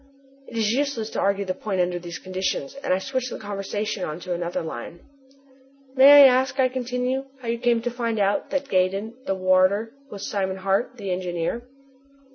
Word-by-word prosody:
'" 275 0 -29
It 235 - -8
is 220 -1 +2
useless 255 -4 -1
to - - -3
argue 200 0 +1
the 185 - -1
point 195 0 -3
under 175 0 0
these 170 -1 -7
conditions, 185 -6 -3
and - - -1
I 185 - +4
switch 255 +5 -3
the - - -6
conversation 205 0 -4
on 155 0 -4
to 180 - -3
another 175 0 -3
line. 160 +2 -7 0.9
"May 280 +2 +9
I - - +10
ask," 265 +1 +3
I 255 -1 +4
continue, 250 +1 -2
"how 240 -2 -6
you 235 0 -1
came 240 -1 +2
to 245 - -1
find 230 -2 -2
out 200 0 +1
that 280 -1 -2
Gaydon, 195 +2 0
the 195 - +1
warder, 185 +4 +2 0.2
was 200 -4 -6
Simon 190 -2 -2
Hart, 195 +7 -1
the 200 -4 -4
engineer?" 180 +6 -3
205 Hz, 195 wpm, -24 LUFS, 185-250 Hz, 0.9 s, I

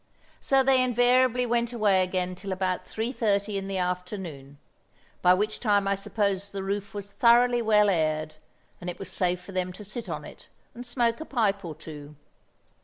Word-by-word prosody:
So 270 -1 +3
they 260 -1 +4
invariably 250 0 +3
went 235 0 0
away 210 -5 +3
again 185 0 -1
till 195 +2 -7
about 185 -1 -2
three 225 +3 -3
thirty 210 -4 0
in 195 0 -3
the 195 -1 -3
afternoon—by 180 -2 -3
which 210 +3 -1
time 205 -3 +2
I 200 - +2
suppose 200 0 -1
the 195 -1 -5
roof 200 +1 -3
was 200 0 -6
thoroughly 240 +2 +4
well 210 -2 +4
aired, 155 -4 0 0.5
and 180 - -5
it 175 - -6
was 195 - -7
safe 180 -1 0
for 180 - -11
them 185 -1 -2
to 210 - -10
sit 220 +4 -6
on - - -5
it - - -13 0.3
and 245 +1 -9
smoke 235 -2 0
a - - -5
pipe 205 -8 0
or 165 -3 -6
two. 150 -1 -10
200 Hz, 180 wpm, -27 LUFS, 180-235 Hz, 0.5 s, they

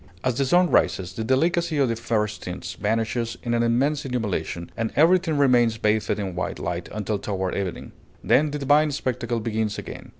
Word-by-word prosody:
As 130 - +1
the 135 +2 +1
sun 175 +4 +4
rises, 95 -1 +1
the 110 - -4
delicacy 160 +6 +1
of 140 -2 +3
the 115 - -1
first 110 -2 -2
tints 90 0 -6
vanishes 115 +3 -1
in 120 -1 -1
an 120 - +2
immense 135 +6 +1
illumination, 100 - -3
and 115 0 -2
everything 165 0 +4
remains 120 -5 +4
bathed 110 0 +1
in 100 -3 -3
white 90 - -3
light - - -4
until 105 -1 -2
toward 95 -3 -2
evening. 95 -4 -4 0.3
Then 150 +2 +3
the 145 - -3
divine 145 +2 +3
spectacle 125 -4 -2
begins 110 -1 -2
again. - - -8
115 Hz, 180 wpm, -24 LUFS, 105-140 Hz, 0.3 s, sun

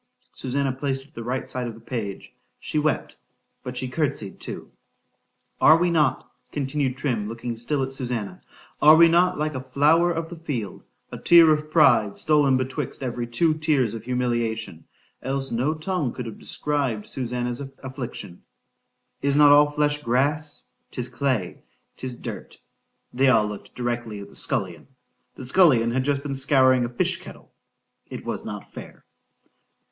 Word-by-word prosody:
—Susannah 135 +1 -1
placed 135 0 -3
it 140 - -23
to - - -32
the 115 - -7
right 130 +3 -3
side 125 -1 -3
of 115 - -7
the - - -14
page—she 115 +5 -6
wept—but 135 -3 -5
she 130 - -2
court'sied 130 -7 -3
too.—Are 160 - -1
we 175 +1 +1
not, 150 -6 +1 0.2
continued 135 -2 -1
Trim, 120 -7 -1
looking 115 +1 -5
still 135 +5 -1
at 130 - -4
Susannah—are 125 +4 +1
we 170 +1 +8
not 180 +2 +3
like 155 0 -1
a 130 - -4
flower 150 +6 +3
of 165 0 -4
the 170 - -8
field—a 125 - -7
tear 170 -2 +7
of 155 0 0
pride 150 -10 +4
stole 150 -2 +3
in 130 -1 +4
betwixt 130 +1 -4
every 120 -1 -3
two 155 +7 +2
tears 150 -8 +1
of 110 -2 -7
humiliation—else 120 +2 -3
no 130 +7 0
tongue 155 -4 -2
could 125 - -6
have 115 - -8
described 135 -8 -2
Susannah's 125 -1 -3 0.2
affliction—is 130 +2 -7
not 145 0 +7
all 145 0 +6
flesh 145 0 0
grass?—Tis 140 0 -2
clay,—'tis 125 - -4
dirt.—They 130 +2 -5
all 110 -4 +4
looked 105 -1 -8
directly 120 -3 -3
at 100 - -9
the - - -17
scullion,—the 130 - -4
scullion 130 -6 +4
had 130 +2 0
just 140 0 -1
been 145 -2 -3
scouring 130 -2 +3
a - - -4
fish 120 - 0
kettle.—It - - -14
was - - -3
not - - -8
fair. - - -11
130 Hz, 140 wpm, -24 LUFS, 120-150 Hz, 0.2 s, we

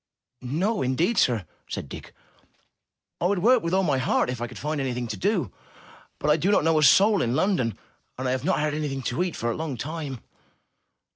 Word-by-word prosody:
''No, 175 - 0
indeed, 160 - +1
sir!'' 115 -7 +2 0.2
said - - -5
Dick. - - -9 1.1
''I 175 - +3
would 200 +1 +1
work 235 +6 +4
with 165 - -2
all 190 - +3
my 145 -6 +1
heart, 130 -1 +1
if 125 -2 -6
I 120 - -2
could 125 - -11
find 150 0 -2
anything 125 -2 -2
to - - -3
do. 185 - -1 0.6
But 150 - +1
I 150 - +4
do 175 +5 0
not 205 - +3
know 160 0 +3
a - - +1
single 200 - +6
soul - - 0
in 120 +1 0
London, 135 - +1 0.4
and 130 0 -3
I - - +1
have 130 -1 -1
not 185 +5 +1
had 150 0 0
anything 145 -3 -3
to 120 +7 -1
eat 180 -2 -1
for 120 0 -1
a - - -3
long 155 -5 -4
time.' 145 -1 -5
150 Hz, 220 wpm, -25 LUFS, 125-180 Hz, 1.1 s, single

